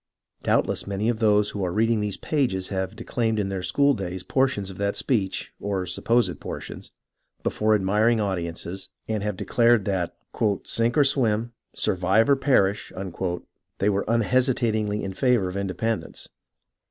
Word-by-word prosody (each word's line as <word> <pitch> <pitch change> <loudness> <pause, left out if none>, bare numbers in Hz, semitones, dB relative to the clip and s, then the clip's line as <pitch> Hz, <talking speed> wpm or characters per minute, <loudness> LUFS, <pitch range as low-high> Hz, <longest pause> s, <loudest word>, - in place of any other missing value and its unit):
Doubtless - - +1
many 100 +3 -1
of 115 -2 -1
those 105 -2 +3
who 100 - -3
are 90 - -1
reading 115 +3 +2
these 105 -2 -2
pages 120 -12 -1
have 95 +1 -3
declaimed 110 -1 -1
in 100 -2 0
their 95 -1 -3
school 140 +11 +3
days 95 -5 -4
portions 130 -8 0
of 95 - -12
that 100 0 0
speech, 100 -7 -1
or 100 -2 -2
supposed 115 +7 +1
portions, - - -7 0.5
before 110 0 +2
admiring 105 +4 +2
audiences, 95 -1 -3 0.2
and 110 -2 -1
have 105 -2 -2
declared 115 -1 +3
that 95 -4 -1 0.3
" 100 -3 +1
sink 115 +3 +1
or 145 - +7
swim, 120 -4 +1 0.2
survive 95 +8 +2
or - - +7
perish," 105 -8 +2 0.9
they 100 - +2
were 100 0 0
unhesi 125 +3 +2
tatingly 110 -3 0
in 95 - -4
favour 120 -3 +2
of 90 - -5
independence. 100 +3 -3
105 Hz, 155 wpm, -25 LUFS, 95-115 Hz, 0.9 s, or